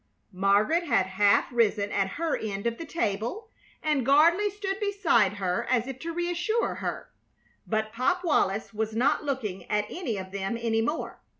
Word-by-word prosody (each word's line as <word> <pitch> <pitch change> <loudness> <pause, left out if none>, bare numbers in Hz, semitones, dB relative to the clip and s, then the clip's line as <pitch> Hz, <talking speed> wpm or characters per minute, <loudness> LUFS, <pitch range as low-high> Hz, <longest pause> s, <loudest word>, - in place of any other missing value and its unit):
Margaret 200 - +3
had 190 - +2
half 200 +2 +3
risen 210 -3 +2
at 195 -1 0
her 330 -2 0
end 200 -1 -4
of 235 0 -1
the 330 - -6
table, 240 - -2 0.3
and 300 -4 +1
Gardley 330 - +4
stood 395 -1 -4
beside 380 - +2
her 185 -3 -2
as 245 -2 +2
if 265 -1 -7
to 335 +3 -4
reassure 350 +6 -1
her; - - -5 0.6
but 215 0 -1
Pop 265 +10 0
Wallis 220 - +1
was 220 0 -2
not 245 +5 +2
looking 245 -10 -4
at 210 0 +1
any 270 - -3
of 190 0 -7
them 195 +3 -3
any 225 -1 +1
more. 295 +8 -3
235 Hz, 170 wpm, -27 LUFS, 205-335 Hz, 0.6 s, Gardley